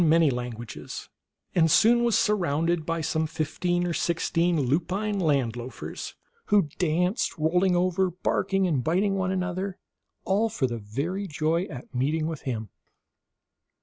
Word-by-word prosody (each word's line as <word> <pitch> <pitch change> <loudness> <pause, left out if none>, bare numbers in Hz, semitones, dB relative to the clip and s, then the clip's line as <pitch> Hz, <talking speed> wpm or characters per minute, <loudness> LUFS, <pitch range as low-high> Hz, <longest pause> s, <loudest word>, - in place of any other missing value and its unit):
171 165 0 +5
many 150 -6 +3 0.2
languages, 115 0 -8 0.4
and 165 -2 +4
soon 235 +8 +5
was 235 -2 +3
surrounded 170 -4 +1
by 165 0 -1
some 160 0 0
fifteen 175 +3 -1
or 175 - -1
sixteen 170 +1 +1
lupine 180 - 0
land 140 -9 +1
loafers, 120 +1 -7 0.3
who 200 -7 +3
danced, 180 +5 +1
roll 160 +4 +2
ing 185 -2 +3
over, 185 +1 +2
barking 190 +2 0
and 150 -8 +1
biting 190 - +2
one 190 -1 0
another, 185 +1 -2 0.5
all 210 +4 +2
for 210 -11 0
very 140 - -3
joy 160 +2 0
at 135 -6 -10
meeting 150 +5 0
with 160 -2 -4
him. 110 -4 -3
170 Hz, 145 wpm, -26 LUFS, 155-185 Hz, 0.5 s, 171